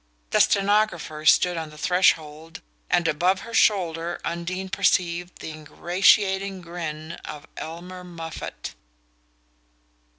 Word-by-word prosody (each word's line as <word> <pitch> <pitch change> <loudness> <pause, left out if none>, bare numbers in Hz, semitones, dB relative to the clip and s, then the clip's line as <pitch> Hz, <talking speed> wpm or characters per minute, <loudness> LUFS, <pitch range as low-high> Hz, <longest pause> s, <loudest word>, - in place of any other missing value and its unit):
The - - +3
stenographer 195 -7 +2
stood 180 +1 +5
on 160 -1 -4
the 150 - -14
threshold, 160 -2 +1 0.3
and 170 - +2
above 180 +5 +2
her 230 - -10
shoulder 175 -6 +2
Undine 180 +3 -3
perceived 175 -2 0
the - - -6
ingratiating 190 +5 +2
grin 165 -2 -6
of 150 0 -8
Elmer 180 +3 -8
Moffatt. 165 -2 -7
175 Hz, 105 wpm, -24 LUFS, 160-185 Hz, 0.3 s, stood